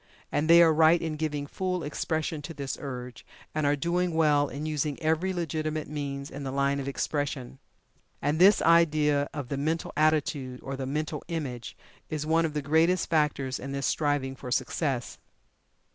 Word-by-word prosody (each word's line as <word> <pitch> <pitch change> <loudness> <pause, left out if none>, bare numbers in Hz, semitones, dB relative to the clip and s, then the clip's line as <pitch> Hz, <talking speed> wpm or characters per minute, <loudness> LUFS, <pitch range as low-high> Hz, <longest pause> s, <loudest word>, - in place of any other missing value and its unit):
And 150 +2 0
they 170 +1 +9
are 160 -1 +5
right 160 +2 +5
in 160 -1 -3
giving 150 -2 -2
full 180 +3 -3
expression 155 +1 -2
to 165 +2 -8
this 140 -2 -4
urge, 125 -3 -7 0.3
and 155 -1 0
are 145 - +3
doing 170 +3 0
well 150 -3 +3
in 145 +3 -5
using 150 -2 -2
every 160 +4 +1
legitimate 155 -3 -2
means 140 -2 -5
in 140 - -7
the 135 - -4
line 140 +1 +1
of 135 - -4
expression. 140 -2 -3 0.6
And 145 +3 0
this 195 +3 +6
idea 150 -4 +4
of 145 -5 -6
the 140 - -2
Mental 160 +4 -2
Attitude, 150 -4 +1
or 135 - -4
the 135 -1 -4
Mental 150 +1 -3
Image, 125 - -5 0.3
is 150 -1 -3
one 165 +1 +3
of 155 -2 -4
the 150 - -1
greatest 165 +5 +2
factors 145 -4 +1
in 140 +1 -6
this 140 -1 -2
striving 145 -3 0
for 130 -1 -8
Success. 130 0 -1
150 Hz, 175 wpm, -28 LUFS, 140-160 Hz, 0.6 s, they